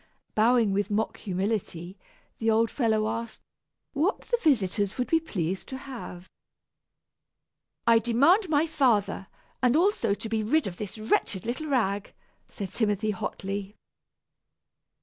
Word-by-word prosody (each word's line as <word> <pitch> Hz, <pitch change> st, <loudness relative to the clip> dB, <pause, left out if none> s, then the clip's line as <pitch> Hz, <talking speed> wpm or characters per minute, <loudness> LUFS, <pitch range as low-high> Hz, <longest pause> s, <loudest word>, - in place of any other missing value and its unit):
Bowing 225 Hz, -1 st, +3 dB
with 205 Hz, +1 st, 0 dB
mock 215 Hz, +1 st, -1 dB
humility, 190 Hz, -3 st, -3 dB, 0.4 s
the 225 Hz, -, +1 dB
old 225 Hz, +1 st, +3 dB
fellow 220 Hz, -4 st, +1 dB
asked 230 Hz, +1 st, -4 dB, 0.5 s
what 320 Hz, +9 st, 0 dB
his 480 Hz, -1 st, -1 dB
visitors 205 Hz, -, +1 dB
would 250 Hz, -, -1 dB
be 325 Hz, -, +3 dB
pleased 190 Hz, -, -3 dB
to 265 Hz, -, -5 dB
have. 235 Hz, -9 st, -8 dB, 1.6 s
"I 230 Hz, -1 st, +6 dB
demand 285 Hz, -, +3 dB
my 305 Hz, 0 st, +3 dB
father, 245 Hz, -11 st, +1 dB, 0.3 s
and 250 Hz, 0 st, +3 dB
also 320 Hz, -, +2 dB
to 225 Hz, -, -6 dB
be 220 Hz, 0 st, 0 dB
rid 280 Hz, +9 st, +2 dB
of 180 Hz, -3 st, -5 dB
this 205 Hz, 0 st, -6 dB
wretched 215 Hz, -3 st, 0 dB
little 260 Hz, +7 st, -3 dB
rag," 205 Hz, -8 st, 0 dB, 0.4 s
said 200 Hz, -3 st, -6 dB
Timothy 215 Hz, 0 st, 0 dB
hotly. 195 Hz, +1 st, -4 dB
220 Hz, 130 wpm, -27 LUFS, 200-260 Hz, 1.6 s, I